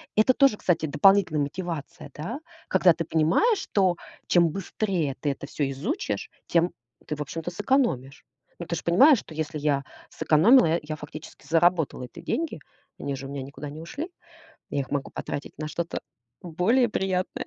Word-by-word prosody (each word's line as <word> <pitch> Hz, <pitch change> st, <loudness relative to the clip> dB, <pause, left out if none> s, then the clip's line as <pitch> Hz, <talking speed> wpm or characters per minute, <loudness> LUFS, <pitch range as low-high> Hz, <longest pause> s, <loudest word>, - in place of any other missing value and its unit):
Это 220 Hz, +5 st, +5 dB
тоже, 275 Hz, -4 st, +4 dB
кстати, 165 Hz, -3 st, +1 dB
дополнительная 175 Hz, 0 st, +4 dB
мотивация, 160 Hz, 0 st, -5 dB
да? 205 Hz, -, -5 dB, 0.3 s
Когда 185 Hz, -2 st, +5 dB
ты 165 Hz, +1 st, -3 dB
понимаешь, 165 Hz, -, +2 dB
что 185 Hz, -4 st, +1 dB, 0.3 s
чем 170 Hz, -1 st, +5 dB
быстрее 185 Hz, -5 st, -2 dB
ты 145 Hz, -, 0 dB
это 140 Hz, 0 st, -7 dB
всё 145 Hz, -2 st, -2 dB
изучишь, 195 Hz, -, -3 dB, 0.2 s
тем 170 Hz, +1 st, +2 dB, 0.4 s
ты, 150 Hz, -, -2 dB
в 150 Hz, -, -5 dB
общем-то, 165 Hz, +4 st, -4 dB
сэкономишь. 175 Hz, -, 0 dB, 0.4 s
Но 170 Hz, -, -6 dB
ты 170 Hz, -, -2 dB
ж 160 Hz, -, -5 dB
понимаешь, 260 Hz, -, +6 dB
что 160 Hz, -, -12 dB
если 155 Hz, -1 st, -3 dB
я 145 Hz, -2 st, +1 dB, 0.3 s
сэкономила, 220 Hz, -, +5 dB
э, 165 Hz, +2 st, +2 dB
я 155 Hz, 0 st, -4 dB
фактически 150 Hz, -1 st, -11 dB
заработала 165 Hz, -4 st, +2 dB
эти 125 Hz, +7 st, -10 dB
деньги. 315 Hz, -, -2 dB, 0.4 s
Они 140 Hz, -1 st, -3 dB
же 135 Hz, -, -7 dB
у -, -, -10 dB
меня 140 Hz, -1 st, -4 dB
никуда 140 Hz, +2 st, -8 dB
не 155 Hz, -, -8 dB
ушли. 295 Hz, -, -6 dB, 0.6 s
Я 145 Hz, -, 0 dB
их 135 Hz, -, -5 dB
могу 140 Hz, -1 st, -2 dB
потратить 140 Hz, -, -5 dB
на 155 Hz, -, -3 dB
что-то 170 Hz, +2 st, -3 dB, 0.4 s
более 190 Hz, +9 st, +2 dB
приятное, 185 Hz, -2 st, -2 dB
165 Hz, 170 wpm, -26 LUFS, 150-195 Hz, 0.6 s, понимаешь